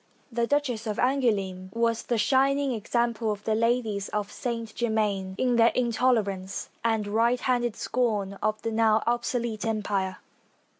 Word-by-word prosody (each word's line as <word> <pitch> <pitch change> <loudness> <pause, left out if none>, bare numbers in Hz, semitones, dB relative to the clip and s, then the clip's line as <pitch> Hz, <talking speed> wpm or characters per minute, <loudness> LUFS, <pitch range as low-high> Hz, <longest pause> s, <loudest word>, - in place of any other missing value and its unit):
The 235 0 0
Duchess 250 -6 0
of 210 - -2
Angouleme 205 -8 0
was 230 -1 +1
the 240 - -1
shining 275 +4 +2
example 235 0 0
of 205 -1 -5
the 220 - 0
ladies 225 -3 0
of 210 -1 -3
Saint 230 -4 -4
Germain 210 -5 -1
in 250 -2 +2
their 230 0 +6
intolerance 220 -6 0
and 225 -2 +1
high 230 +4 +2
handed 240 -3 0
scorn 215 -7 -1
of 215 +1 0
the 225 - -1
now 220 -1 +3
obsolete 235 -2 -1
Empire. 200 -4 -1
225 Hz, 145 wpm, -27 LUFS, 210-240 Hz, -, their